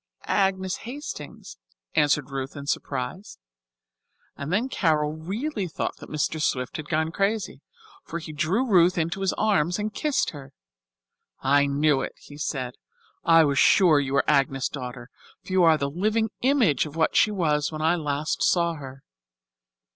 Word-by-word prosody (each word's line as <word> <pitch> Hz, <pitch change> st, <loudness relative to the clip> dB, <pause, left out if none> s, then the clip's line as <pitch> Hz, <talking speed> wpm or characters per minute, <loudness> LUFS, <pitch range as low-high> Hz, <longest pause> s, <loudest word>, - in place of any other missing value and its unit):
"Agnes 190 Hz, -1 st, 0 dB
Hastings," 235 Hz, -, -8 dB, 0.4 s
answered 145 Hz, -1 st, +2 dB
Ruth 135 Hz, +1 st, -4 dB
in 140 Hz, -1 st, -7 dB
surprise. 140 Hz, +7 st, -4 dB, 1.0 s
And 140 Hz, +3 st, -5 dB
then 215 Hz, +7 st, +1 dB
Carol 155 Hz, -, +1 dB
really 200 Hz, -, -3 dB
thought 160 Hz, -, -4 dB
that -, -, -12 dB
Mr. 155 Hz, +1 st, -1 dB
Swift 125 Hz, -3 st, -1 dB
had 155 Hz, -1 st, -8 dB
gone 160 Hz, 0 st, 0 dB
crazy, 200 Hz, +3 st, -1 dB, 0.4 s
for 170 Hz, -, -5 dB
he 165 Hz, -1 st, -7 dB
drew 175 Hz, -, 0 dB
Ruth 180 Hz, -6 st, +4 dB
into 170 Hz, +3 st, -1 dB
his 195 Hz, -, +1 dB
arms 185 Hz, -6 st, +1 dB
and 210 Hz, 0 st, -3 dB
kissed 300 Hz, -3 st, 0 dB
her. 140 Hz, -3 st, -11 dB, 0.9 s
"I 140 Hz, +1 st, +3 dB
knew 145 Hz, 0 st, +2 dB
it," -, -, -5 dB
he 145 Hz, 0 st, -14 dB
said. 130 Hz, -4 st, -3 dB, 0.5 s
"I 165 Hz, -1 st, +6 dB
was 140 Hz, -2 st, +1 dB
sure 170 Hz, -7 st, +5 dB
you 135 Hz, -1 st, -2 dB
were 140 Hz, -, +2 dB
Agnes' 135 Hz, -2 st, +2 dB
daughter, 125 Hz, -2 st, -7 dB, 0.3 s
for 185 Hz, -, -7 dB
you 185 Hz, -, +4 dB
are 160 Hz, -2 st, +6 dB
the 140 Hz, -, -1 dB
living 215 Hz, +8 st, 0 dB
image 245 Hz, -, +3 dB
of 150 Hz, -, -11 dB
what 160 Hz, -1 st, +1 dB
she -, -, +5 dB
was 155 Hz, -8 st, 0 dB
when 155 Hz, 0 st, -4 dB
I 165 Hz, +2 st, +3 dB
last 150 Hz, -2 st, -2 dB
saw 170 Hz, -1 st, +2 dB
her. 135 Hz, -3 st, -10 dB
160 Hz, 160 wpm, -25 LUFS, 140-190 Hz, 1.0 s, I